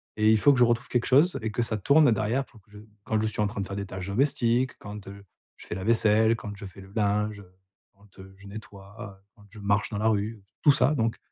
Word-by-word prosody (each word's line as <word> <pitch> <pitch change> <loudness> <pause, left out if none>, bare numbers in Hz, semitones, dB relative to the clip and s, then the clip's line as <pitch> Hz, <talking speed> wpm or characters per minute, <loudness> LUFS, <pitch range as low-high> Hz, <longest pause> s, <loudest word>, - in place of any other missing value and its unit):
Et 110 0 +3
il 110 - +5
faut 140 +6 +5
que 125 - 0
je - - +7
retrouve 120 0 +1
quelque 120 -1 0
chose 140 +2 +4
et 110 - -2
que 120 - -1
ça 110 - -2
tourne 140 +5 +4
derrière 115 +5 0
pour 110 - -20
que 105 - -34
je 105 - -12 0.2
quand 110 -1 -1
je 110 - 0
suis 105 - -3
en 105 - +2
train 100 - -5
de 95 - -4
faire 100 - -6
des 100 0 -4
tâches 95 0 -7
domestiques, 125 +2 0
quand, 105 -1 -9
heu, 100 0 -11 0.3
je - - -14
fais - - -5
la 95 - -5
vaisselle, 110 0 +3
quand 105 -2 -8
je 100 0 -9
fais 95 +1 -13
le 95 0 -15
linge, 105 0 0
heu, 90 -3 -16 0.4
quand, 100 -1 -23
heu, 95 0 -12
je 100 - -16
nettoie 100 -1 -11 0.2
heu, 95 - -31
quand 105 - -19
je 105 - -16
marche 100 +1 0
dans 105 - -5
la 110 +2 0
rue, 105 -1 -1 0.2
tout 145 - +6
ça, 140 +2 +3
donc. 115 -2 -1
105 Hz, 275 wpm, -26 LUFS, 100-115 Hz, 0.4 s, je